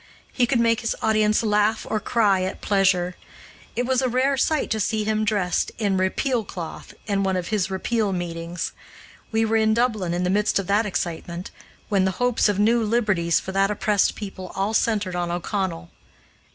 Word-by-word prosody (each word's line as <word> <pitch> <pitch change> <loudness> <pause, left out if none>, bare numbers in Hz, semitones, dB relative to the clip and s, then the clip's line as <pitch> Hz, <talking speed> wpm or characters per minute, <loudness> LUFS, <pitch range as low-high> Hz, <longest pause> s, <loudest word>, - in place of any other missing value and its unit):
He 245 -2 +2
could 245 -1 +1
make 230 -1 +3
his 230 - -1
audience 215 0 +3
laugh 210 0 +1
or 215 - -1
cry 205 -4 +2
at 185 +1 -3
pleasure. 190 -3 +1 0.6
It 245 - 0
was 260 0 +1
a 260 - +1
rare 260 +3 +2
sight 305 +3 0
to 220 - 0
see 215 +1 0
him 215 0 0
dressed 205 -4 0
in 205 -3 0
"Repeal 225 +6 0
cloth" 175 -5 -8
in 200 -2 0
one 190 -1 0
of 180 -1 -4
his 205 -4 0
Repeal 205 +2 -1
meetings. 170 -1 -4 0.6
We 225 0 +2
were 225 0 +2
in 220 0 +3
Dublin 215 -8 0
in 175 - -1
the 180 - +1
midst 210 +2 +2
of 195 - -1
that 205 +3 +2
excitement, 170 -1 -4 0.4
when 195 -2 +2
the 190 - -1
hopes 245 -3 +2
of 205 - 0
new 230 +3 +3
liberties 205 -7 +1
for 190 - -6
that 195 +1 +2
oppressed 210 -1 +1
people 195 -3 -7
all 195 +3 -1
centered 205 -5 +1
on 175 -1 -1
O'Connell. 175 -1 -3
205 Hz, 190 wpm, -23 LUFS, 185-220 Hz, 0.6 s, make